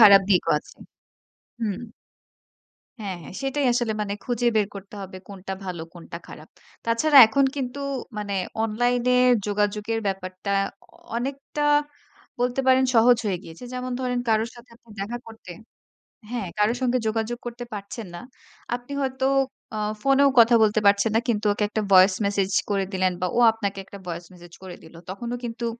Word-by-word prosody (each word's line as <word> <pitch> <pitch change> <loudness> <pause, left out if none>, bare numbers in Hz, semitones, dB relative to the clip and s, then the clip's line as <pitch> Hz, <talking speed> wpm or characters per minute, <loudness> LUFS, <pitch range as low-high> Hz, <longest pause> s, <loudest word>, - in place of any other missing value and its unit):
খারাপ 200 -3 +10
দিকও 180 -3 +3
আছে। - - -17 0.8
হুম। 210 -4 -2 1.2
হ্যাঁ, 195 -3 -4
হ্যাঁ 155 - -11
সেটাই 275 +1 -1
আসলে 240 -2 0
মানে 200 -1 -2
খুঁজে 245 -1 -1
বের 210 -2 +3
করতে 200 +1 -10
হবে 190 0 -9
কোনটা 195 -1 -7
ভালো 180 -3 -5
কোনটা 170 -1 -9
খারাপ। 155 - -12 0.4
তাছাড়া 275 +6 +4
এখন 275 +6 +2
কিন্তু 260 0 -3 0.4
মানে 205 -1 -3 0.3
অনলাইন 245 +3 +1
এ - - +4 0.3
যোগাযোগের 210 +2 -1
ব্যাপারটা 190 0 -4 0.7
অনেকটা 275 +4 -4 0.8
বলতে 245 +2 +1
পারেন 260 0 +5
সহজ 240 +2 +6
হয়ে 190 -3 0
গিয়েছে। 165 +8 -11
যেমন 255 0 -4
ধরেন 250 -1 -1
কারো 220 0 +3
সাথে 240 0 -16
তো - - -42
দেখা 210 +5 -3
করতে। 225 -4 -12 0.8
হ্যাঁ 235 -6 -3
কারো 210 +2 +3
সঙ্গে 255 0 +2
যোগাযোগ 225 +2 -1
করতে 240 0 -6
পারছেন 205 +1 -7
না। - - -7 0.5
আপনি 245 +2 -10
হয়তো 265 -1 -1 0.5
আ - - -3 0.2
ফোনেও 275 +2 +4
কথা 235 +1 +7
বলতে 215 0 +3
পারছেন 200 +2 +4
না - - +5
কিন্তু 215 -3 0
ওকে 210 - -2
একটা 215 +1 -1
ভয়েস 185 +1 +7
মেসেজ 200 -1 0 0.2
করে 200 -1 +1
দিলেন 185 0 +2
বা 180 - +1
ও - - +4
আপনাকে 205 -3 -4
একটা 200 - -11
ভয়েস 170 0 -5
মেসেজ 175 -1 -15
করে 185 -2 -8
দিল। 160 +1 -15
তখনও 235 +6 -4
কিন্তু 235 0 -4
220 Hz, 165 wpm, -24 LUFS, 195-245 Hz, 1.2 s, খারাপ